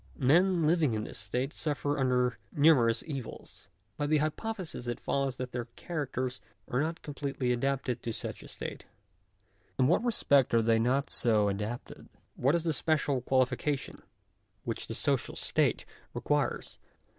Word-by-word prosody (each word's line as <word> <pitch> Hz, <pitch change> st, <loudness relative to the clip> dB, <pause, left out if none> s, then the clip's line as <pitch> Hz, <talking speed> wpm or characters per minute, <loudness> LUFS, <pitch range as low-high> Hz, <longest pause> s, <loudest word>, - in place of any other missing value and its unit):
Men 170 Hz, +5 st, +4 dB
living 155 Hz, -7 st, +3 dB
in 110 Hz, -, -2 dB
this -, -, -6 dB
state 125 Hz, +8 st, -2 dB
suffer: 145 Hz, -1 st, -1 dB
under 125 Hz, -1 st, +2 dB
numerous 140 Hz, -7 st, +4 dB
evils. 135 Hz, -7 st, -8 dB, 0.3 s
By 145 Hz, -, -1 dB
the 155 Hz, +1 st, +3 dB
hypothesis 160 Hz, -, -3 dB
it 120 Hz, -, -2 dB
follows 135 Hz, -2 st, -1 dB
that 125 Hz, -1 st, -5 dB
their 120 Hz, -1 st, -3 dB
\ 120 Hz, -, -33 dB
characters 130 Hz, -6 st, -3 dB, 0.3 s
are 125 Hz, -, 0 dB
not 165 Hz, +2 st, -3 dB
completely 140 Hz, -3 st, -2 dB
adapted 130 Hz, 0 st, -1 dB
to 115 Hz, -, -3 dB
such -, -, -4 dB
a -, -, -11 dB
state. -, -, -6 dB
j -, -, -17 dB, 0.9 s
In 130 Hz, -, +4 dB
what 175 Hz, +9 st, +3 dB
respect 140 Hz, -, +3 dB
are 115 Hz, -, +4 dB
they 115 Hz, 0 st, +3 dB
not 130 Hz, +5 st, +1 dB
so 105 Hz, -3 st, +2 dB
adapted? 105 Hz, +5 st, -5 dB, 0.3 s
what 135 Hz, +6 st, +2 dB
is 170 Hz, -, 0 dB
the 165 Hz, -2 st, +1 dB
special: 145 Hz, -3 st, +1 dB
qualification 130 Hz, +2 st, 0 dB, 0.6 s
which 115 Hz, -, -4 dB
the 115 Hz, -, -5 dB
social 135 Hz, 0 st, 0 dB
state -, -, +1 dB, 0.3 s
requires -, -, -1 dB
135 Hz, 155 wpm, -30 LUFS, 120-150 Hz, 0.9 s, Men